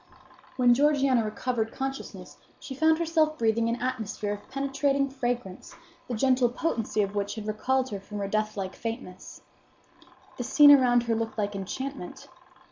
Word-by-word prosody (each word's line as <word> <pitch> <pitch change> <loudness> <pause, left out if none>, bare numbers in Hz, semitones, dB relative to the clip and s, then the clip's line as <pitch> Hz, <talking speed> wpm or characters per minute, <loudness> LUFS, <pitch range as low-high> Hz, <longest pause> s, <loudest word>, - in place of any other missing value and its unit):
When 245 -2 +5
Georgiana 275 -3 +3
recovered 225 +1 -2
consciousness 270 0 -6 0.2
she 270 - -8
found 315 +3 +3
herself 320 -2 +1
breathing 230 0 +1
an 235 +1 -2
atmosphere 220 -4 -3
of 205 0 -10
penetrating 275 0 0
fragrance, 245 -7 -4 0.3
the 245 - -3
gentle 255 +1 +3
potency 230 -6 -1
of 200 0 -4
which 200 -1 -2
had 215 -2 -6
recalled 260 +5 0
her 200 - -4
from 205 +2 -9
her 200 -1 -2
deathlike 215 -2 -2
faintness. 225 -5 -7 1.0
The 245 - -3
scene 290 +4 +7
around 245 -4 +5
her 235 -1 0
looked 225 0 -3
like 205 -1 -2
enchantment. 230 +2 -6
240 Hz, 150 wpm, -27 LUFS, 215-270 Hz, 1.0 s, scene